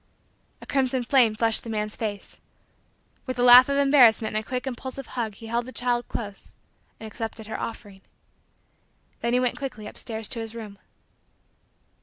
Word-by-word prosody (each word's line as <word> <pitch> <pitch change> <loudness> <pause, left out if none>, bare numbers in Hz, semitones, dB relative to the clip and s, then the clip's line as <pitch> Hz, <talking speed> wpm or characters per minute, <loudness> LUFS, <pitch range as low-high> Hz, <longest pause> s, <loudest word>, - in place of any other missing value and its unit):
A - - -10
crimson 260 -2 0
flame 240 -3 +3
flushed 225 0 +1
the 230 - -8
man's 215 -1 -3
face. 205 -3 -5 0.9
With 255 - -3
a 245 - +1
laugh 250 +2 +9
of 280 - +1
embarrassment 250 -6 +5
and 215 - 0
a - - -23
quick 255 0 -3
impulsive 260 +1 -6
hug 225 -4 -4
he 225 - -12
held 235 +2 -2
the - - -8
child 245 -1 -1
close 205 -4 -7 0.4
and 220 - -9
accepted 220 0 -6
her 220 - -5
offering. 205 -4 -7 1.2
Then 235 0 -1
he 250 - +4
went 250 +2 0
quickly 260 -7 -6
upstairs 220 0 -6
to 240 - -3
his 225 0 -6
room. 210 -3 -9
235 Hz, 170 wpm, -25 LUFS, 220-255 Hz, 1.2 s, laugh